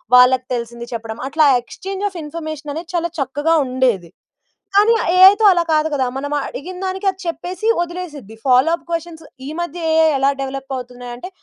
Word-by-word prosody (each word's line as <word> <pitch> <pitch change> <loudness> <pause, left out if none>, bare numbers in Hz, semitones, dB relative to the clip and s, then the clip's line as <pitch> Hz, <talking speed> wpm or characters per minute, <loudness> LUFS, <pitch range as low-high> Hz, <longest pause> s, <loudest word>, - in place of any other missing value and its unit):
వాళ్ళకి 250 0 +6
తెలిసింది 235 0 -5
చెప్పడం. 225 -1 -5
అట్లా, 305 +2 +3 0.2
ఎక్స్చేంజ్ 385 +10 -7
ఆఫ్ 370 - -11
ఇన్ఫర్మేషన్ 310 -1 -6
అనేది 330 +2 -7
చాలా 340 0 0
చక్కగా 290 +4 0
ఉండేది. 245 -9 0 0.7
కానీ 425 +3 +6
ఆహ్, - - -2
ఏఐతో 390 +4 +7
అలా 345 -1 +2
కాదు 310 0 +2
కదా! 265 -2 +1
మనమ 285 +2 -3
అడిగినదానికి 375 +4 -5
అది 380 0 -2
చెప్పేసి, 360 +4 -4
వదిలేసిద్ది. 335 - -6
ఫాలో 255 +4 +5
అప్ 325 -2 -6
క్వెషన్స్ 330 -1 -4 0.2
ఈ - - -5
మధ్య 345 0 -4 0.2
ఏఐ 320 0 +5
ఎలా 275 +1 +3
డెవలప్ 270 0 -5
అవుతున్నాయంటే 245 +3 -8
305 Hz, 165 wpm, -19 LUFS, 255-345 Hz, 0.7 s, ఏఐతో